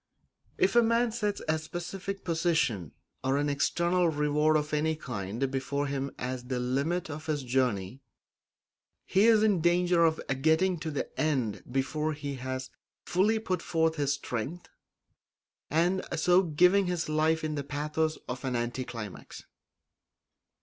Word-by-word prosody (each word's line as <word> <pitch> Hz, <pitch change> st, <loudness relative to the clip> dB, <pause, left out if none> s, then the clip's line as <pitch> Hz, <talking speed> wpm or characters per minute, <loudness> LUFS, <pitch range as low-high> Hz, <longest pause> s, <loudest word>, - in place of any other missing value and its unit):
If -, -, +2 dB
a 240 Hz, -, +8 dB
man 230 Hz, +1 st, +2 dB
sets 210 Hz, -3 st, -2 dB
a 155 Hz, 0 st, +1 dB
specific 180 Hz, +4 st, -6 dB
position 160 Hz, -, 0 dB, 0.3 s
or 135 Hz, +1 st, +1 dB
an 145 Hz, 0 st, +1 dB
external 170 Hz, +5 st, +2 dB
reward 150 Hz, 0 st, +2 dB
of 150 Hz, 0 st, -3 dB
any 155 Hz, +1 st, +1 dB
kind 120 Hz, -2 st, -3 dB
before 140 Hz, +2 st, -1 dB
him 140 Hz, -1 st, -2 dB
as 125 Hz, -1 st, -4 dB
the 125 Hz, 0 st, -2 dB
limit 140 Hz, +8 st, -1 dB
of 155 Hz, 0 st, -7 dB
his 150 Hz, -3 st, -1 dB
journey, 125 Hz, -3 st, -1 dB, 1.0 s
he 195 Hz, +4 st, +4 dB
is 220 Hz, -2 st, +5 dB
in 205 Hz, -6 st, +3 dB
danger 175 Hz, 0 st, +3 dB
of 160 Hz, -1 st, +3 dB, 0.2 s
getting 165 Hz, +4 st, +3 dB
to 160 Hz, -, -4 dB
the 145 Hz, -, -2 dB
end 130 Hz, -9 st, 0 dB
before 150 Hz, +4 st, -1 dB
he 145 Hz, -1 st, -5 dB
has 130 Hz, +1 st, -5 dB, 0.3 s
fully 205 Hz, +5 st, +2 dB
put 185 Hz, -5 st, -2 dB
forth 160 Hz, -1 st, +1 dB
his 140 Hz, -1 st, +1 dB
strength, 135 Hz, +11 st, -5 dB, 1.0 s
and 175 Hz, +5 st, +2 dB
so 180 Hz, +3 st, +5 dB
giving 180 Hz, +3 st, +4 dB
his 175 Hz, -2 st, -1 dB
life 155 Hz, +1 st, +1 dB
the 150 Hz, -2 st, -2 dB
pathos 150 Hz, +2 st, -1 dB
of 125 Hz, +2 st, -5 dB
an 130 Hz, -2 st, -1 dB
anti 120 Hz, +2 st, -2 dB
climax. 115 Hz, -6 st, -8 dB
155 Hz, 145 wpm, -29 LUFS, 135-175 Hz, 1.0 s, a